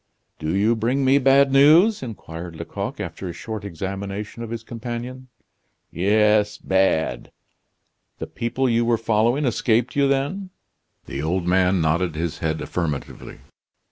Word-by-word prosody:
"Do 80 Hz, +3 st, -2 dB
you 105 Hz, +4 st, +3 dB
bring 125 Hz, +5 st, 0 dB
me 135 Hz, +2 st, +5 dB
bad 135 Hz, +1 st, +4 dB
news?" 160 Hz, +10 st, +5 dB
inquired 85 Hz, -8 st, -8 dB
Lecoq, -, -, -5 dB
after 95 Hz, -, -5 dB
a -, -, -5 dB
short 110 Hz, +1 st, -6 dB
examination 100 Hz, +4 st, -5 dB
of 115 Hz, -, -6 dB
his 115 Hz, 0 st, -5 dB
companion. 120 Hz, +2 st, -6 dB, 0.6 s
"Yes, 105 Hz, +3 st, +2 dB
bad." 85 Hz, -9 st, 0 dB, 0.9 s
"The -, -, -5 dB
people 130 Hz, +3 st, -2 dB
you 120 Hz, -1 st, +2 dB
were 115 Hz, 0 st, +2 dB
following 115 Hz, +5 st, +1 dB
escaped 120 Hz, 0 st, +1 dB
you, 140 Hz, -1 st, +3 dB
then?" 145 Hz, +9 st, -1 dB, 0.6 s
The 70 Hz, -, -5 dB
old 85 Hz, +3 st, -1 dB
man 90 Hz, 0 st, +2 dB
nodded 80 Hz, +1 st, 0 dB
his 80 Hz, 0 st, -3 dB
head 80 Hz, -3 st, -2 dB
affirmatively. 75 Hz, -6 st, -5 dB
110 Hz, 140 wpm, -22 LUFS, 90-130 Hz, 0.9 s, me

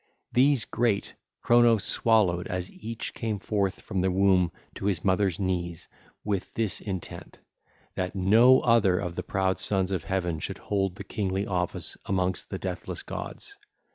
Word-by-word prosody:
These 135 Hz, -1 st, +3 dB
great 115 Hz, -4 st, 0 dB, 0.3 s
Cronos 120 Hz, -3 st, +5 dB
swallowed 100 Hz, -8 st, +3 dB
as 90 Hz, 0 st, -4 dB
each 115 Hz, +1 st, -6 dB
came 110 Hz, -2 st, -2 dB
forth 100 Hz, -1 st, -1 dB
from 95 Hz, -, -2 dB
the 95 Hz, -, +2 dB
womb 95 Hz, -2 st, +3 dB, 0.2 s
to -, -, -7 dB
his 100 Hz, -3 st, 0 dB
mother's 95 Hz, -2 st, +2 dB
knees 90 Hz, -3 st, -2 dB, 0.4 s
with 100 Hz, -3 st, -2 dB
this 110 Hz, -5 st, -1 dB
intent, 95 Hz, -4 st, -6 dB, 0.6 s
that 90 Hz, +1 st, -3 dB
no 115 Hz, +7 st, +6 dB
other 110 Hz, -6 st, +4 dB
of 90 Hz, -3 st, -3 dB
the -, -, -3 dB
proud 95 Hz, -1 st, -1 dB
sons 95 Hz, -2 st, +2 dB
of 90 Hz, -4 st, -2 dB
Heaven 90 Hz, -3 st, -1 dB
should -, -, -5 dB
hold 95 Hz, -2 st, -1 dB
the -, -, -7 dB
kingly 100 Hz, -1 st, -2 dB
office 90 Hz, -3 st, -2 dB
amongst 95 Hz, -1 st, -1 dB
the -, -, -4 dB
deathless -, -, -5 dB
gods. -, -, -7 dB
95 Hz, 155 wpm, -27 LUFS, 90-110 Hz, 0.6 s, no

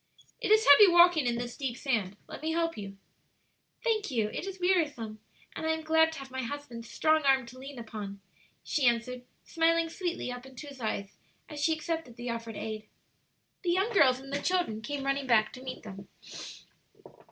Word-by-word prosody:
"It -, -, -1 dB
is 435 Hz, +1 st, +5 dB
heavy 340 Hz, +9 st, +10 dB
walking 345 Hz, -5 st, +6 dB
in 240 Hz, -, +1 dB
this 240 Hz, 0 st, -4 dB
deep 265 Hz, -4 st, -3 dB
sand; 210 Hz, -8 st, -1 dB
let -, -, -9 dB
me 320 Hz, +1 st, -1 dB
help 330 Hz, 0 st, 0 dB
you." 195 Hz, -1 st, -8 dB, 0.9 s
"Thank 435 Hz, -4 st, +1 dB
you; 225 Hz, -6 st, 0 dB
it 360 Hz, -, -5 dB
is 385 Hz, -1 st, -6 dB
wearisome, 295 Hz, -, 0 dB, 0.4 s
and 320 Hz, -, -3 dB
I 320 Hz, -, +3 dB
am 320 Hz, 0 st, -4 dB
glad 320 Hz, +1 st, +4 dB
to -, -, -8 dB
have 270 Hz, -1 st, -10 dB
my 260 Hz, 0 st, -3 dB
husband's 235 Hz, -3 st, -6 dB
strong 315 Hz, 0 st, +3 dB
arm 270 Hz, -3 st, +3 dB
to 245 Hz, +2 st, -12 dB
lean 270 Hz, +1 st, -9 dB
upon," 210 Hz, -4 st, -7 dB, 0.4 s
she 275 Hz, -5 st, +1 dB
answered, 240 Hz, +1 st, 0 dB, 0.2 s
smiling 330 Hz, 0 st, +2 dB
sweetly 345 Hz, -7 st, -3 dB
up 245 Hz, +1 st, -8 dB
into 265 Hz, +3 st, -10 dB
his 275 Hz, -3 st, -11 dB
eyes 200 Hz, -3 st, -3 dB, 0.3 s
as 300 Hz, -, -8 dB
she 320 Hz, +1 st, +4 dB
accepted 320 Hz, -5 st, -4 dB
the 240 Hz, 0 st, -4 dB
offered 230 Hz, -1 st, -5 dB
aid. 215 Hz, -1 st, -5 dB, 0.7 s
The 350 Hz, -2 st, +1 dB
young 390 Hz, +6 st, +1 dB
girls 260 Hz, -10 st, +5 dB
and 270 Hz, +1 st, -10 dB
the 285 Hz, -, -1 dB
children 350 Hz, -13 st, 0 dB
came 280 Hz, +4 st, -4 dB
running 275 Hz, 0 st, 0 dB
back 220 Hz, -3 st, +3 dB
to 255 Hz, -, -9 dB
meet 260 Hz, -1 st, -7 dB
them. 195 Hz, -2 st, -9 dB
270 Hz, 195 wpm, -30 LUFS, 235-320 Hz, 0.9 s, heavy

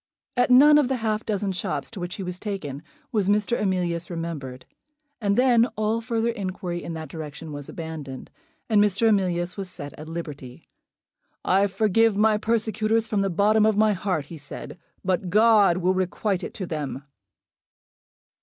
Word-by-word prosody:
At 245 Hz, 0 st, +2 dB
none 295 Hz, +4 st, +8 dB
of 285 Hz, -, +2 dB
the 265 Hz, -, 0 dB
half 220 Hz, -2 st, -2 dB
dozen 205 Hz, -2 st, -1 dB
shops 185 Hz, -, -3 dB
to 215 Hz, -, -8 dB
which 175 Hz, 0 st, -5 dB
he 195 Hz, -, -5 dB
was 180 Hz, 0 st, -5 dB
taken 160 Hz, -10 st, -5 dB, 0.3 s
was 205 Hz, -5 st, +1 dB
Mr. 210 Hz, +3 st, +2 dB
Emilius 175 Hz, -4 st, -1 dB
remembered; 160 Hz, -7 st, -5 dB, 0.6 s
and 200 Hz, -1 st, +1 dB
then 245 Hz, -2 st, +5 dB
all 215 Hz, +2 st, 0 dB
further 230 Hz, 0 st, 0 dB
inquiry 185 Hz, -4 st, -4 dB
in 165 Hz, -, -5 dB
that 160 Hz, -1 st, -6 dB
direction 155 Hz, 0 st, -8 dB
was 145 Hz, -1 st, -7 dB
abandoned, 155 Hz, -5 st, -7 dB, 0.4 s
and 215 Hz, -3 st, +4 dB
Mr. 210 Hz, +2 st, +2 dB
Emilius 180 Hz, -3 st, 0 dB
was 195 Hz, -2 st, -4 dB
set 145 Hz, -5 st, -4 dB
at 155 Hz, +1 st, -8 dB
liberty. 145 Hz, -7 st, -8 dB, 0.8 s
"I 195 Hz, +2 st, +3 dB
forgive 215 Hz, +2 st, +2 dB
my 215 Hz, 0 st, +3 dB
persecutors 220 Hz, 0 st, 0 dB
from 210 Hz, -2 st, 0 dB
the 195 Hz, -, +1 dB
bottom 210 Hz, +4 st, +3 dB
of 215 Hz, -1 st, +3 dB
my 215 Hz, 0 st, +4 dB
heart," 180 Hz, -6 st, -2 dB
he 160 Hz, +1 st, -10 dB
said, 145 Hz, +4 st, -9 dB, 0.3 s
"but 185 Hz, 0 st, 0 dB
God 210 Hz, -2 st, +5 dB
will 185 Hz, +1 st, +2 dB
requite 185 Hz, +1 st, -1 dB
it -, -, -6 dB
to 190 Hz, -, -4 dB
them." 145 Hz, -4 st, -4 dB
195 Hz, 170 wpm, -25 LUFS, 170-215 Hz, 0.8 s, none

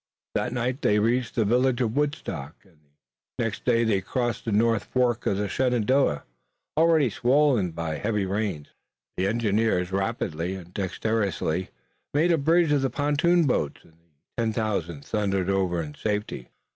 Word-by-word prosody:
That 125 Hz, -, -1 dB
night 125 Hz, +2 st, -2 dB
they 105 Hz, -, +3 dB
reached 115 Hz, +3 st, +1 dB
the 115 Hz, -, +2 dB
village 125 Hz, +3 st, +2 dB
of 115 Hz, -3 st, 0 dB
Woodstock, 140 Hz, -, -2 dB
and 90 Hz, -6 st, -25 dB, 0.6 s
the -, -, 0 dB
next 115 Hz, -2 st, -4 dB
day 115 Hz, -2 st, +3 dB
they 105 Hz, -4 st, +1 dB
crossed 120 Hz, +4 st, -2 dB
the 115 Hz, -, -1 dB
north 115 Hz, +1 st, +2 dB
fork 125 Hz, -3 st, 0 dB
of 95 Hz, -, +1 dB
the 105 Hz, 0 st, -1 dB
Shenandoah, 125 Hz, -, +1 dB, 0.5 s
already 160 Hz, -5 st, +4 dB
swollen 125 Hz, -6 st, +3 dB
by 85 Hz, -1 st, -4 dB
the 75 Hz, -, -5 dB
heavy 105 Hz, -2 st, 0 dB
rains. 95 Hz, -6 st, -2 dB, 0.5 s
The 95 Hz, -, 0 dB
engineers 105 Hz, -4 st, +1 dB
rapidly 95 Hz, -4 st, -2 dB
and 90 Hz, -1 st, -11 dB
dexterously 95 Hz, -3 st, -1 dB, 0.5 s
made 165 Hz, +4 st, +3 dB
a 165 Hz, -, +3 dB
bridge 165 Hz, +2 st, +3 dB
of 145 Hz, -2 st, +3 dB
the 135 Hz, -, +1 dB
pontoon 150 Hz, +6 st, +2 dB
boats, 75 Hz, -, -1 dB
and -, -, -21 dB
the 80 Hz, +4 st, -10 dB
ten 110 Hz, -1 st, 0 dB
thousand 85 Hz, -9 st, -2 dB
thundered 95 Hz, -3 st, 0 dB
over 95 Hz, -3 st, 0 dB
in 75 Hz, -1 st, -8 dB
safety. 105 Hz, -, -3 dB
110 Hz, 165 wpm, -26 LUFS, 95-125 Hz, 0.6 s, already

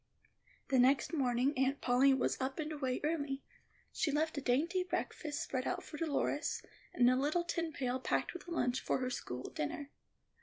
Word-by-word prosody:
The 265 Hz, -2 st, +4 dB
next 265 Hz, +6 st, +4 dB
morning 260 Hz, -1 st, +2 dB
Aunt 270 Hz, +1 st, +2 dB
Polly 255 Hz, +2 st, +4 dB
was 265 Hz, 0 st, +1 dB
up 265 Hz, +1 st, -2 dB
and 310 Hz, 0 st, -3 dB
away 265 Hz, -4 st, -2 dB
early. 285 Hz, -3 st, -1 dB, 0.5 s
She 315 Hz, -, +1 dB
left 310 Hz, +2 st, +1 dB
a 285 Hz, -, -2 dB
dainty 320 Hz, +9 st, +2 dB
breakfast 305 Hz, -4 st, -3 dB
spread 255 Hz, -1 st, -2 dB
out -, -, -2 dB
for -, -, -9 dB
Dolores, 295 Hz, -1 st, 0 dB, 0.3 s
and 245 Hz, -1 st, +4 dB
a 255 Hz, -, +5 dB
little 295 Hz, +6 st, +1 dB
tin 335 Hz, -1 st, -2 dB
pail 255 Hz, -3 st, -1 dB
packed -, -, 0 dB
with 360 Hz, -, -9 dB
a -, -, -7 dB
lunch 250 Hz, -6 st, +1 dB
for -, -, 0 dB
her 255 Hz, -1 st, -2 dB
school 125 Hz, -, -5 dB
dinner. 280 Hz, -, -4 dB
275 Hz, 185 wpm, -35 LUFS, 255-310 Hz, 0.5 s, a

